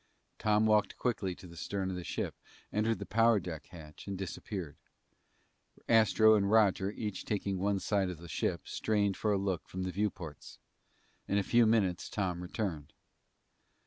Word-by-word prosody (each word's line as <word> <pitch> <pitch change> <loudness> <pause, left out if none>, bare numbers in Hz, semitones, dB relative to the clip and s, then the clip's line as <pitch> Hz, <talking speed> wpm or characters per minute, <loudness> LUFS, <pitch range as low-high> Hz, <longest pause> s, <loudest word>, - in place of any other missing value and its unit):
Tom 105 0 +3
walked 105 -2 +3
quickly 100 -7 -1
to - - -13
the 85 -1 -11
stern 95 +2 -3
of - - -4
the 90 - -5
ship, - - -3 0.4
entered 110 +2 +1
the - - -6
power 115 -1 +4
deck 85 -4 -7
hatch, 80 -1 -12
and 100 -1 -3
disappeared. 95 -3 -5 1.1
Astro 110 -1 +6
and 100 -2 +3
Roger, 100 -3 +4
each 105 -2 -4
taking 100 -2 -2
one 100 +1 +1
side 100 -1 +1
of 90 - -5
the 85 +2 -11
ship, - - -2
strained 100 -3 0
for 105 - 0
a 100 - +3
look 95 -3 -2
from 95 0 -4
the 95 - -2
viewports. 90 -6 -4 0.7
In 100 - +1
a 100 - +2
few 120 +3 +4
minutes 100 -6 +1
Tom 90 -4 -2
returned. 90 -5 -4
100 Hz, 170 wpm, -32 LUFS, 90-105 Hz, 1.1 s, Astro